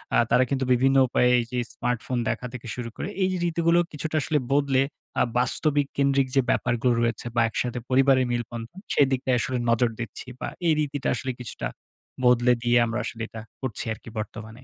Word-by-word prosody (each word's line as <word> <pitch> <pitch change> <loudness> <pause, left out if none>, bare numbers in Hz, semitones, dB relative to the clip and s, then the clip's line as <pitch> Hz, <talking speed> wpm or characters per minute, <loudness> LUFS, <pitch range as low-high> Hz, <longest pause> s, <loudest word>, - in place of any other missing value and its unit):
আ - - +5
তারা 125 - +5
কিন্তু 135 -1 0
বিভিন্ন 135 +2 +3
উপায়ে 125 0 +3
এইযে 120 +1 -3
স্মার্টফোন 125 +1 -2
দেখা 120 +2 -2
থেকে 125 -1 -8
শুরু 120 -2 -5
করে - - -4 0.2
এই 185 - +2
রীতিগুলো, 170 0 +2
কিছুটা 155 +1 -4
আসলে 150 +1 +1
বদলে, 140 -2 +3 0.4
আ - - +6 0.2
বাস্তবিক 145 +3 +1
কেন্দ্রিক 140 -1 +3
যে, 135 - +6
ব্যাপারগুলো 120 +1 +2
রয়েছে, 115 0 -1
বা 120 - +4
একসাথে 125 +2 -2
পরিবারের 130 0 +4
মিলবন্ধন 120 - -5
সেদিকটায় 130 -2 +2
আসলে 130 +1 -1
নজর 115 +1 +3
দিচ্ছি। 115 +2 -6
বা - - -3 0.2
এই 160 - +5
রীতিটা 145 -2 -2
আসলে 130 +2 -3
কিছুটা 110 - -5 0.6
বদলে 125 0 +5
দিয়ে, 120 0 +4
আমরা 115 +1 -2
আসলে 115 0 -6
এটা 110 - -8 0.2
করছি 130 -6 -3
আরকি 115 - -12
বর্তমানে। 110 +3 -7
125 Hz, 175 wpm, -25 LUFS, 120-135 Hz, 0.6 s, আ